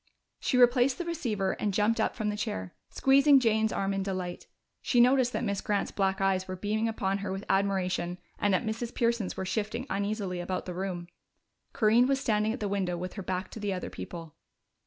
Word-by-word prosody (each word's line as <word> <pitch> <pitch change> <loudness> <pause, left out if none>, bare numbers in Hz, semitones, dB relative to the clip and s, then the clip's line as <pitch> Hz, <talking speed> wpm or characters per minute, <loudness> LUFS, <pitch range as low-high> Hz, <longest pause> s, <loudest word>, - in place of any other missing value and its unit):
She 255 - 0
replaced 250 +1 +5
the 350 - -4
receiver 230 - -1
and 210 - 0
jumped 220 +2 +2
up - - 0
from 215 -1 -1
the 210 - -2
chair, 95 - -4 0.2
squeezing 275 +1 +5
Jane's 220 -3 +2
arm 195 0 -1
in 195 - -1
delight. 185 -2 -4 0.3
She 245 - +2
noticed 250 0 +5
that - - -1
Miss 200 -3 -1
Grant's 205 -1 -1
black 195 0 0
eyes 190 -1 +1
were 185 - -4
beaming 215 +4 -1
upon 200 -3 -1
her 195 -1 -4
with 195 +1 -5
admiration 185 -3 0 0.2
and 205 - +2
that 185 - +1
Mrs. 225 +2 -3
Pearson's 230 -4 0
were 190 - -2
shifting 220 +5 -2
uneasily 200 -2 -2
about 180 +1 -3
the 180 - -5
room. 180 -1 -4 0.7
Corinne 230 +3 +4
was 270 0 +1
standing 215 -4 +1
at 250 - -4
the 205 - 0
window 190 -3 -1
with 180 +1 -5
her 200 - -6
back 185 0 -3
to - - -8
the 205 -2 -1
other 180 - -5
people. 165 -3 -8
205 Hz, 205 wpm, -29 LUFS, 190-230 Hz, 0.7 s, replaced